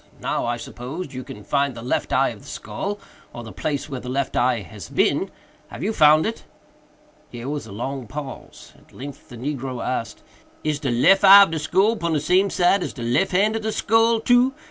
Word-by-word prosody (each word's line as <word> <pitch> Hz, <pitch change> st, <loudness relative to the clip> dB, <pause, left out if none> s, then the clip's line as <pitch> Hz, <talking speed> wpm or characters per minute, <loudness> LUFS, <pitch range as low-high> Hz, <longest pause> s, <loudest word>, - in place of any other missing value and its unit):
Now, -, -, -2 dB
I 120 Hz, 0 st, -1 dB
suppose, 135 Hz, +7 st, -7 dB
you 130 Hz, 0 st, -6 dB
can 105 Hz, -3 st, -10 dB
find 140 Hz, +3 st, 0 dB
the 115 Hz, -, -8 dB
left 125 Hz, -, -2 dB
eye -, -, +3 dB
of -, -, -9 dB
the -, -, -16 dB
skull, 195 Hz, -, -5 dB, 0.4 s
or 120 Hz, -, -8 dB
the 110 Hz, -, -9 dB
place 145 Hz, -2 st, -3 dB
where 135 Hz, -4 st, -5 dB
the 125 Hz, -, -8 dB
left 135 Hz, +1 st, -2 dB
eye 120 Hz, -2 st, +2 dB
has 90 Hz, -, -10 dB
been. -, -, +1 dB, 0.4 s
Have -, -, -8 dB
you 220 Hz, -, 0 dB
found 155 Hz, -3 st, +5 dB
it?" 225 Hz, -, -4 dB, 0.9 s
Here 120 Hz, +1 st, -8 dB
was 145 Hz, -4 st, -4 dB
a -, -, -11 dB
long 130 Hz, +4 st, -5 dB
pause. 140 Hz, +1 st, -9 dB
At -, -, -23 dB
length 140 Hz, +1 st, -10 dB
the 120 Hz, -, -10 dB
negro 130 Hz, -1 st, -4 dB
asked, 115 Hz, -4 st, -4 dB, 0.4 s
"Is 150 Hz, -1 st, -1 dB
de 140 Hz, -3 st, -2 dB
lef 160 Hz, -, +4 dB
eye 200 Hz, +1 st, +10 dB
of 195 Hz, -, -1 dB
de 160 Hz, -, -2 dB
skull 200 Hz, +9 st, +2 dB
pon 170 Hz, -3 st, -1 dB
de 150 Hz, -, +1 dB
same 185 Hz, +6 st, +2 dB
side 190 Hz, +1 st, +2 dB
as -, -, -4 dB
de 120 Hz, -, -7 dB
lef 125 Hz, +11 st, +1 dB
hand 205 Hz, +4 st, +2 dB
of -, -, -5 dB
de 220 Hz, 0 st, -2 dB
skull, 225 Hz, +2 st, +2 dB
too? 245 Hz, +3 st, +3 dB
145 Hz, 220 wpm, -22 LUFS, 125-195 Hz, 0.9 s, eye